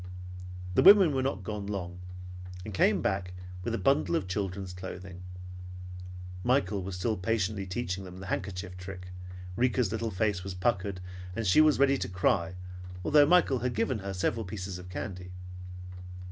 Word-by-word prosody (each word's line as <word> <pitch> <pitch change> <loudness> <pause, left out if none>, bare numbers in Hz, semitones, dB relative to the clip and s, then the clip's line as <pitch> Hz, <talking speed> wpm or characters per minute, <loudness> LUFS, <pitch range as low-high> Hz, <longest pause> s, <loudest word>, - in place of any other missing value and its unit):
The - - +5
women 195 -6 +9
were 135 - +2
not 130 -8 -1
gone 105 0 -4
long, 90 -3 -4 0.7
and 105 - -5
came - - +4
back 95 -2 0 0.3
with - - 0
a - - 0
bundle 135 - +3
of 165 - 0
children's 95 -1 -2
clothing. 95 0 -7 1.2
Michael 105 -6 +2
was 95 0 -4
still 110 +5 0
patiently 100 0 0
teaching 95 -1 -2
them 90 -1 -9
the 95 - -7
handkerchief 90 -1 -3
trick, 90 0 -7 0.5
Rika's 120 -2 +2
little 115 +1 -1
face 100 -2 0
was 95 -1 -4
puckered, 95 -1 0 0.3
and 115 0 -1
she 95 +11 +7
was 155 -1 +6
ready 140 0 +4
to 95 - -2
cry 90 -1 +2 0.5
although 145 -1 +7
Michael 165 -6 +5
had 125 0 -1
given 115 +2 +1
her 100 0 -4
several 100 +4 0
pieces 95 -1 -5
of 90 0 -9
candy. 90 -1 -5
95 Hz, 160 wpm, -30 LUFS, 90-115 Hz, 1.2 s, women